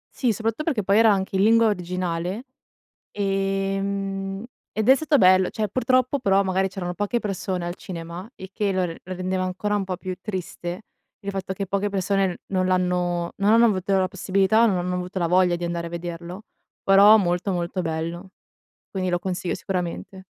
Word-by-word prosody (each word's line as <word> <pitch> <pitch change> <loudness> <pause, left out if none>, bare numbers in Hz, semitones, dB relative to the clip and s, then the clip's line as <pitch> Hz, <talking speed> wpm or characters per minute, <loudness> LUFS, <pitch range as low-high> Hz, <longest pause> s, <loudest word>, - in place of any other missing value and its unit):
Sì, 250 -3 +1
soprattutto 225 +7 -2
perché, 275 -10 0
poi, 195 +2 +3
era 225 -1 +6
anche 195 0 -1
in 190 - +3
lingua 230 +1 +5
originale, 180 +1 -2 0.7
ehm, 195 0 -2 0.3
ed 220 +2 0
è 265 - +9
stato 310 +1 +2
bello, 185 -3 +5
cioè 215 -1 -2
purtroppo, 255 +4 +1
però, 195 -5 +3
magari 190 0 +1
c'erano 180 -2 -4
poche 205 +5 -1
persone 190 -4 -3
al 175 0 -4
cinema 170 +3 -8
e 190 - -9
che 205 0 0
l - - -3 0.3
lo 185 - -6
rendeva 185 +1 -2
ancora 190 +3 -1
un 205 - 0
po' 185 -1 -4
più 185 0 -5
triste, 180 -2 -5 0.4
il 200 - -5
fatto 190 -1 -4
che 195 +1 -4
poche 200 +2 0
persone 195 -1 0
non 185 -1 0
l'hanno 180 -1 0
non 200 +1 +3
hanno 230 +1 +6
avuto 195 -3 +1
la 185 -1 +2
possibilità 195 +3 +2
o - - +7
non 195 -4 +1
hanno 180 +1 -2
avuto 180 +1 -4
la 170 - +1
voglia 180 0 +3
di 175 - -6
andare 170 0 -3
a - - -8
vederlo, 170 +3 -6 0.4
però, 200 +3 +7
molto, 180 0 0
molto 175 +1 -2
bello, 165 +3 -4 0.6
quindi 185 -1 -2
lo 175 - +1
consiglio 180 0 -3
sicuramente. 185 +1 -4
190 Hz, 185 wpm, -24 LUFS, 180-200 Hz, 0.7 s, è